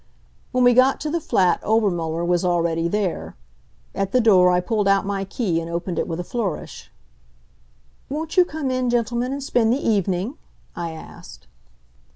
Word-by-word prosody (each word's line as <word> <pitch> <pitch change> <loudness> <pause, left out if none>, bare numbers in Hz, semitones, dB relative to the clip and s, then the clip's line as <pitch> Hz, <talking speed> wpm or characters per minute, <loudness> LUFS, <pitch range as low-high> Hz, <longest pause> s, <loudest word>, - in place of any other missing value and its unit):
When 255 -1 +2
we 245 0 +6
got 255 +2 +4
to 305 - -3
the 340 - 0
flat 185 -10 +2
Obermuller 175 -7 0
was 175 0 +1
already 170 -2 +1
there. 195 -1 -2 0.6
At 195 -1 -2
the 255 - +4
door 190 -6 +5
I 180 0 +3
pulled 210 +2 -1
out 195 0 +3
my 195 -1 -2
key 185 -5 -1
and 165 - -7
opened 170 +1 -3
it - - -1
with 165 -1 -4
a - - -2
flourish. 200 -3 -5 1.2
"Won't 310 +3 -4
you 365 - +7
come 305 -5 -4
in, 255 -1 0
gentlemen, 240 +1 0
and 280 0 -4
spend 235 -4 +2
the 250 - +2
evening?" 200 - 0 0.4
I 170 -1 -4
asked. 160 - -12
200 Hz, 175 wpm, -22 LUFS, 175-245 Hz, 1.2 s, you